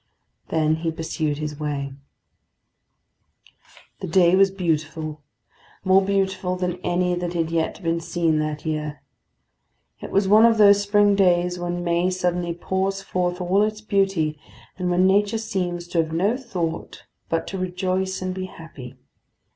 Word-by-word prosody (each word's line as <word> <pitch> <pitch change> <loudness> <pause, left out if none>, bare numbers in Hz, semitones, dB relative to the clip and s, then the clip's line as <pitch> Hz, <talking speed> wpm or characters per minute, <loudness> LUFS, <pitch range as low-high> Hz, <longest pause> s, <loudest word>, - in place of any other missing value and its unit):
Then 155 -1 +1
he 165 +1 -2
pursued 160 -2 -2
his 150 -1 -5
way. 140 -2 -3 2.1
The - - -5
day 175 +1 +4
was 195 +1 +5
beautiful; 155 -4 -3 0.6
more 190 +1 +5
beautiful 190 -2 0
than 180 -1 -2
any 180 0 0
that 175 0 -3
had 165 -1 -1
yet 165 +3 -1
been 165 0 0
seen 165 -2 0
that 155 0 -3
year. 150 -2 -3 1.0
It - - -7
was 195 0 +2
one 215 +3 +6
of 225 -1 +3
those 205 -1 +6
spring 205 0 +3
days 180 -2 +2
when 175 0 -3
May 170 +1 +1
suddenly 180 -2 -1
pours 190 +2 -2
forth 180 -1 -1
all 185 +3 +2
its 215 0 -1
beauty, 195 -7 0 0.4
and 180 -1 -2
when 180 +1 +3
nature 205 +3 +3
seems 180 -6 -3
to 170 - 0
have 160 -1 0
no 190 +8 +1
thought 180 -11 -5 0.3
but 165 0 -1
to 190 - -5
rejoice 185 +1 -2
and 185 0 -2
be 185 0 -4
happy. 150 -8 -11
180 Hz, 150 wpm, -23 LUFS, 165-190 Hz, 2.1 s, one